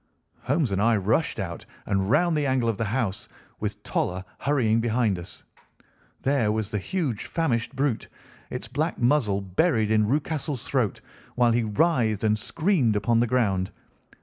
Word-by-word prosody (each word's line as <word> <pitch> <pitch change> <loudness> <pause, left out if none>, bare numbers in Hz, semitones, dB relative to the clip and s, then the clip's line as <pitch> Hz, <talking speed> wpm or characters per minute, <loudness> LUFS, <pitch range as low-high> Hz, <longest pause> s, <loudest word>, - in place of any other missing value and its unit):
Holmes 140 -2 0
and 95 0 0
I 115 +1 +4
rushed 110 - 0
out 85 -3 -5 0.2
and 95 -1 0
round 170 +7 +3
the 150 -2 +1
angle 130 -3 +1
of 110 - -2
the 115 - 0
house, 105 -3 -2 0.3
with - - -4
Toller 90 +1 -2
hurrying 115 -6 +2
behind 115 -4 +1
us. 85 - -9 0.8
There 135 -6 +2
was 110 -1 -2
the 105 - -1
huge 135 - -2
famished 135 -6 -1
brute, 135 -4 0 0.4
its - - -5
black 155 +4 -1
muzzle 120 -6 +2
buried 110 - +1
in 110 -1 +3
Rucastle's 145 -1 -2
throat, 125 -8 0 0.3
while 120 -1 +4
he 115 0 +2
writhed 110 - +1
and 105 -1 +3
screamed 155 - +1
upon 115 +3 +2
the 120 - +2
ground. 100 -7 +1
115 Hz, 160 wpm, -25 LUFS, 105-140 Hz, 0.8 s, I